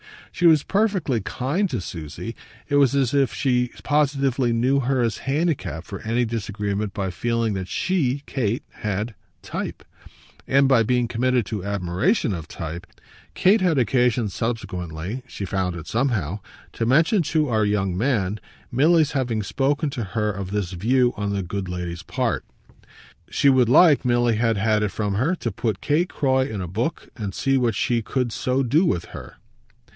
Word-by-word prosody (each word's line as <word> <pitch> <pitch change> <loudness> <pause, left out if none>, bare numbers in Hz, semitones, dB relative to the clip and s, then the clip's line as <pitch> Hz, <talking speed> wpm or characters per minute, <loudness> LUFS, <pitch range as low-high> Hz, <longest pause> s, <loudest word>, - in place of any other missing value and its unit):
She 175 -3 +3
was 155 -3 +5
perfectly 195 - +1
kind 145 - -1
to 125 - -2
Susie: 85 +5 -7 0.3
it 145 - +2
was 140 -2 +4
as 135 -2 +1
if 140 -4 +3
she 125 -3 +1
positively 140 -4 +1
knew 125 +4 +2
her 130 0 +1
as 115 -3 0
handicapped 135 - -1
for 100 - -7
any 115 +2 0
disagreement 105 -2 -3
by 95 -3 -2
feeling 115 +3 -1
that 95 -2 -4
she, 145 - 0
Kate, 120 -3 -1
had 105 +2 -3 0.3
"type," - - -5 0.6
and 140 +1 +4
by 130 -3 +5
being 125 +1 +1
committed 125 0 +1
to 105 -5 -4
admiration 100 - 0
of 85 -3 -6
type. 85 +2 -6 0.5
Kate 200 +3 +4
had 175 -5 +2
occasion 120 -1 +2
subsequently 95 -2 -4
she 100 - -6
found 95 -2 -1
it 85 -2 -7
somehow 110 - -1 0.3
to 115 - -2
mention 160 - +4
to 155 -2 +1
our 110 -2 +2
young 95 -3 0
man 105 -3 0 0.3
Milly's 155 +4 +4
having 120 -6 -1
spoken 140 +6 0
to 120 - -3
her 105 -1 +1
of 100 -2 -5
this 100 -3 -2
view 120 +7 +2
on 105 -1 -2
the 100 -1 -1
good 95 +1 -4
lady's 90 -1 -5
part. - - -1 0.9
She 140 - +3
would 130 -3 +4
like 150 +2 +6
Milly 120 -2 +2
had 115 -1 +1
had 105 +1 +2
it 105 - +1
from 100 +1 -2
her 140 - +1
to 120 -9 -3
put 105 +1 -2
Kate 160 +5 +1
Croy 130 -1 +1
in 105 -3 -4
a 90 - -4
book 115 - -3
and 100 -4 -5
see 135 0 +1
what 120 -4 +1
she 120 +3 +1
could 125 +1 -1
so 130 +4 0
do 145 +8 +3
with 90 - 0
her. - - -9
120 Hz, 170 wpm, -23 LUFS, 100-135 Hz, 0.9 s, like